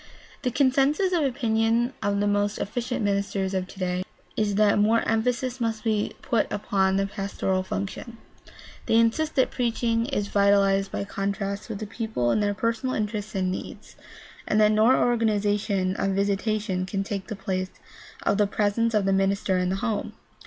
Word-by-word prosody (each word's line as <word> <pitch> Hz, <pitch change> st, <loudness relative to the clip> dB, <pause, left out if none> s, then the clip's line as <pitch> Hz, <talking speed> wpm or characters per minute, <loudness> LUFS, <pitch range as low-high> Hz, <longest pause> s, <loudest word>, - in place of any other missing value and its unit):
The 255 Hz, -, 0 dB
consensus 280 Hz, +8 st, +2 dB
of 335 Hz, -3 st, +2 dB
opinion 235 Hz, -2 st, +1 dB
of 200 Hz, 0 st, 0 dB
the 205 Hz, -, +1 dB
most 205 Hz, 0 st, +1 dB
efficient 245 Hz, +3 st, -3 dB
ministers 200 Hz, -1 st, -1 dB
of 185 Hz, -1 st, -1 dB
today 185 Hz, -1 st, -3 dB, 0.3 s
is 205 Hz, -2 st, 0 dB
that 210 Hz, 0 st, +4 dB
more 220 Hz, +2 st, +3 dB
emphasis 245 Hz, +3 st, 0 dB
must 225 Hz, -2 st, -1 dB
be 215 Hz, -2 st, 0 dB
put 230 Hz, -, 0 dB
upon 195 Hz, -2 st, +1 dB
the 195 Hz, 0 st, +1 dB
pastoral 195 Hz, -1 st, -2 dB
function. 200 Hz, +4 st, -5 dB, 0.7 s
They -, -, +2 dB
insist 230 Hz, +8 st, +2 dB
that 260 Hz, -, +2 dB
preaching 230 Hz, -1 st, 0 dB
is 205 Hz, -8 st, -1 dB
vitalized 200 Hz, -1 st, +3 dB
by -, -, -2 dB
contact 200 Hz, +1 st, -3 dB
with 220 Hz, -, -4 dB
the 215 Hz, -, -5 dB
people 210 Hz, -, -2 dB
in -, -, +2 dB
their 205 Hz, -1 st, 0 dB
personal 230 Hz, +4 st, -1 dB
interests 210 Hz, -1 st, -3 dB
and 185 Hz, -1 st, 0 dB
needs, 185 Hz, -, -7 dB, 0.5 s
and 215 Hz, -, +2 dB
that 210 Hz, 0 st, +5 dB
no 215 Hz, +1 st, +4 dB
organization 205 Hz, -6 st, +1 dB
of 195 Hz, -1 st, 0 dB
visitation 200 Hz, -1 st, 0 dB
can 195 Hz, +1 st, -2 dB
take 195 Hz, -1 st, -5 dB
the 215 Hz, -, -4 dB
place 185 Hz, -1 st, -3 dB, 0.5 s
of 200 Hz, -, +1 dB
the 205 Hz, -, +4 dB
pres 205 Hz, +1 st, 0 dB
ence 230 Hz, 0 st, +2 dB
of 205 Hz, -2 st, +2 dB
the 195 Hz, -, +2 dB
minister 195 Hz, -1 st, +1 dB
in 180 Hz, 0 st, 0 dB
the 190 Hz, -, 0 dB
home. 215 Hz, -3 st, -2 dB
205 Hz, 175 wpm, -25 LUFS, 195-230 Hz, 0.7 s, that